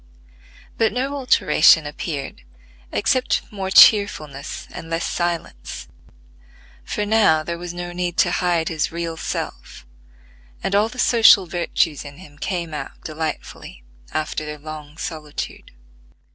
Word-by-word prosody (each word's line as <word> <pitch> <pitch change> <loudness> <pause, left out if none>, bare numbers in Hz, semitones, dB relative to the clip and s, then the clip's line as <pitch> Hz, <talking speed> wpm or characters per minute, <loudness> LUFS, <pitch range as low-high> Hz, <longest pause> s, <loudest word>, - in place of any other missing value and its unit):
But 225 -1 +3
no 265 +3 -2
alteration 160 - +4
appeared, 145 - -5 0.5
except 250 - +1
more 195 -2 -4
cheerfulness 155 -10 +4
and 165 - -8
less 165 +1 -1
silence; 175 -1 -4 0.9
for 210 - -2
now 205 -8 +4
there 170 +1 -4
was 175 0 -5
no 175 0 -6
need 175 0 -3
to 175 - +3
hide 175 -3 +1
his 160 -2 -1
real 165 0 -4
self, - - -6 0.8
and 195 - -1
all 210 +2 +3
the 250 - -12
social 225 -6 +6
virtues 170 -2 -1
in 145 -1 -11
him 145 -5 -15
came 170 -3 -3
out 150 - -7
delightfully 155 - -6 0.3
after 155 0 -2
their 150 0 -6
long 150 0 -9
solitude. 155 -3 -6
170 Hz, 130 wpm, -21 LUFS, 155-190 Hz, 0.9 s, social